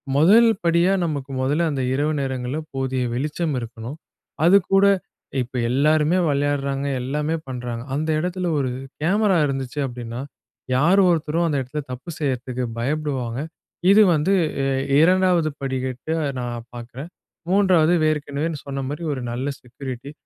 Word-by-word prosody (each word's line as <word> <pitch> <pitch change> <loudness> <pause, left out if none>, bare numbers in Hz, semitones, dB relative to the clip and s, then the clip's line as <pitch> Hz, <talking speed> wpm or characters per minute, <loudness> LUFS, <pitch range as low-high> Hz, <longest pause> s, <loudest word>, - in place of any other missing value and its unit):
முதல் 200 +11 +6 0.2
படியா 170 +2 +3
நமக்கு 145 -4 -3
முதல்ல 150 +6 +1
அந்த 135 -2 -2
இரவு 145 +3 +1
நேரங்கள்ல 130 +1 -2 0.2
போதிய 130 -1 -1
வெளிச்சம் 150 +5 -2
இருக்கணும். 115 +3 -7 0.5
அதுக்கூட 195 +2 +5 0.6
இப்போ 125 +1 -5
எல்லாருமே 150 +6 +3
விளையாடுறாங்க, 140 -1 0 0.2
எல்லாமே 150 +5 -1
பண்ணுறாங்க 120 -2 -5
அந்த 155 +2 -1
இடத்துல 180 +2 -2
ஒரு 130 -2 0 0.3
கேமரா 195 +3 +3
இருந்துச்சு 135 0 -3
அப்படின்னா, 120 -1 -6 0.6
யார் 170 +9 +4
ஒருத்தரும் 165 0 +1
அந்த 150 -3 0
இடத்துல 140 +4 -4
தப்பு 125 +6 -7
செய்யுறதுக்கு 130 -3 -2
பயப்படுவாங்க. 130 -3 -2 0.5
இது 210 +2 +7
வந்து 155 +6 +1 0.3
அ - - +1 0.4
2வது 180 -2 +4
படிகட்டு 130 +2 -3 0.3
நான் 120 -1 -5
பார்க்குறேன். 120 +6 -8 0.4
3வது 185 -4 +4 0.2
ஏற்கெனவே 150 +1 -2 0.2
சொன்ன 140 -1 -4
மாரி 150 +4 -5
ஒரு 130 - -5
நல்ல 125 +3 -3
செக்யூரிட்டி. 130 +2 -8
145 Hz, 125 wpm, -22 LUFS, 130-165 Hz, 0.6 s, இது